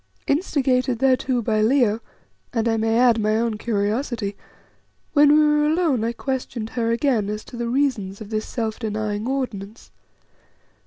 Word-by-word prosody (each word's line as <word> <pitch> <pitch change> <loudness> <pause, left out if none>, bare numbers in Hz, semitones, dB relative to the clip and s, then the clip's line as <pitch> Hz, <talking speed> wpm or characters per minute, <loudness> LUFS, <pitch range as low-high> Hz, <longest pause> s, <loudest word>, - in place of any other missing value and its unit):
Instigated 265 -5 +1
thereto 255 -1 +1
by 215 -1 +1
Leo, 230 -2 +3 0.5
and 230 -1 0
I 225 - +2
may 225 0 +1
add 240 -2 +4
my 215 0 +1
own 225 -2 -1
curiosity, 210 0 -1 0.8
when 290 -1 +6
we 305 0 +5
were 300 0 +3
alone 310 -7 +1
I 230 - 0
questioned 245 -3 -4
her 230 -2 -1
again 235 -4 +1
as 210 0 -4
to - - -12
the 235 0 -3
reasons 235 -8 -1
of 215 -1 -9
this 215 0 -2
self 225 -2 -3
denying 215 -1 -3
ordinance. 230 -5 -4
235 Hz, 155 wpm, -22 LUFS, 215-265 Hz, 0.8 s, when